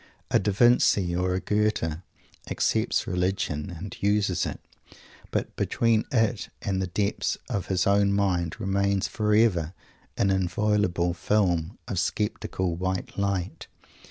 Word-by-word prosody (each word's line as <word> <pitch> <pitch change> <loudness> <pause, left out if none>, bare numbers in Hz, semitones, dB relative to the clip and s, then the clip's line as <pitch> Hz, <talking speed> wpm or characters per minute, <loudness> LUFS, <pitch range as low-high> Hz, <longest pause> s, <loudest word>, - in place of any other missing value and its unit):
A - - +5
Da 105 +2 0
Vinci 100 -5 +4
or 90 +1 0
a - - 0
Goethe 105 -7 0 0.5
accepts - - +1
religion 90 -5 -1
and 90 +3 -7
uses 100 -3 +1
it, - - -6 0.7
but - - -3
between 115 -2 +1
it 115 -3 +1
and 95 -1 -1
the 95 - -1
depths 100 +3 -1
of 100 - -2
his 90 -2 +1
own 100 0 +3
mind 95 -3 0
remains 100 -1 +1
forever 105 -6 +2 0.4
an 100 - +2
inviolable 95 -1 +1
film 85 -3 0
of 100 -7 -2
sceptical 95 -2 -1
"white 95 +1 -3
light." 100 -2 -2
95 Hz, 130 wpm, -26 LUFS, 90-105 Hz, 0.7 s, A